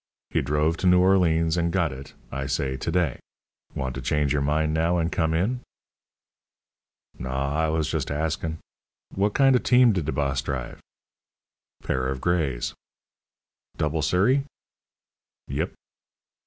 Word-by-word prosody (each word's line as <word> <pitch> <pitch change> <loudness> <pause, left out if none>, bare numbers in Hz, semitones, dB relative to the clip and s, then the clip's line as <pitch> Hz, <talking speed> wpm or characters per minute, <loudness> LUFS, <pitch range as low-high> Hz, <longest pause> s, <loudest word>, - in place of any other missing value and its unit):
"He - - +1
drove 75 +4 +1
to 95 - 0
Noo 90 0 +6
Orleans 85 -3 +3
and 85 0 +1
got 85 -5 +1
it, 65 +2 -11 0.2
I 70 +1 -3
say, 65 -1 -1
to 75 +5 -3
day. 85 -6 0 0.6
Want 65 -1 -2
to 65 - -5
change 70 +2 +1
your 75 - +1
mind 75 +2 +1
now 85 +2 +2
and 85 0 0
come 80 -1 +1
in?" 110 +10 0 1.6
"Naw, 65 +2 -2
I - - +1
was 80 -1 0
just - - -2
askin'. 80 +2 -2 0.6
Wot 100 +2 +1
kind 135 -1 +5
o' - - +4
team 125 -1 +5
did 90 -6 -1
de 80 - -1
boss 70 -1 0
drive?" 65 -3 -5 1.0
"Pair 65 0 -1
of 65 -1 -3
grays." 75 -7 0 1.0
"Double 75 +1 0
surrey?" 105 - +3 1.1
"Yep." - - -2
80 Hz, 145 wpm, -25 LUFS, 70-90 Hz, 1.6 s, Noo